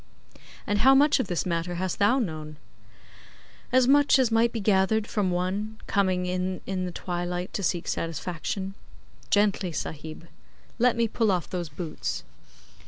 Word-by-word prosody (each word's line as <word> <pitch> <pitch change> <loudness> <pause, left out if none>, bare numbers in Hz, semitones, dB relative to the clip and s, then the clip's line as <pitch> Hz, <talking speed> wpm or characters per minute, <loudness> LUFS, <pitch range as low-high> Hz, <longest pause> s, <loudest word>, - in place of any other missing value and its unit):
'And 205 0 0
how 265 +4 +6
much 285 +1 +5
of 255 - -1
this 175 -2 -1
matter 175 0 -2
hast 185 0 -2
thou 210 +6 +4
known?' 155 - -4 1.1
'As 255 0 +4
much 285 0 +5
as 255 -3 +2
might 230 +1 +3
be 230 - -3
gathered 205 +1 +2
from 205 -4 0
One 190 +5 -2
coming 185 -3 +1
in 185 +1 -2
in 185 -1 -2
the 180 - -4
twilight 175 +1 -4
to - - -2
seek 175 -2 -1
satisfaction. 170 +4 -3 0.6
Gently, 205 -3 +2
Sahib. 160 +1 -6 0.5
Let 245 0 +4
me 235 -1 +2
pull 225 -1 +1
off 180 -4 -1
those 175 -3 -3
boots. 155 +2 -4
190 Hz, 155 wpm, -26 LUFS, 175-220 Hz, 1.1 s, how